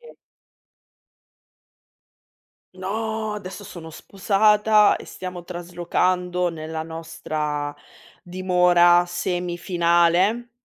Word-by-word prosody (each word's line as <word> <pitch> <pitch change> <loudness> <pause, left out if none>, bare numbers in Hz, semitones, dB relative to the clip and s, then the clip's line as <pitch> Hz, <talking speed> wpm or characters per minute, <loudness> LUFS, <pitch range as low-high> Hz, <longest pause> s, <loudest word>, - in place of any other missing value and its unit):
Sì. 475 - -15 2.7
No, 215 +3 -3
adesso 205 0 -8
sono 165 -3 -10
sposata 210 +4 +3
e - - -11
stiamo 180 -1 -7
traslocando 180 +1 -1
nella 160 0 -6
nostra 150 -2 -4 0.5
dimora 180 -1 +3
semifinale. 175 +4 +1
180 Hz, 70 wpm, -23 LUFS, 170-195 Hz, 2.7 s, sposata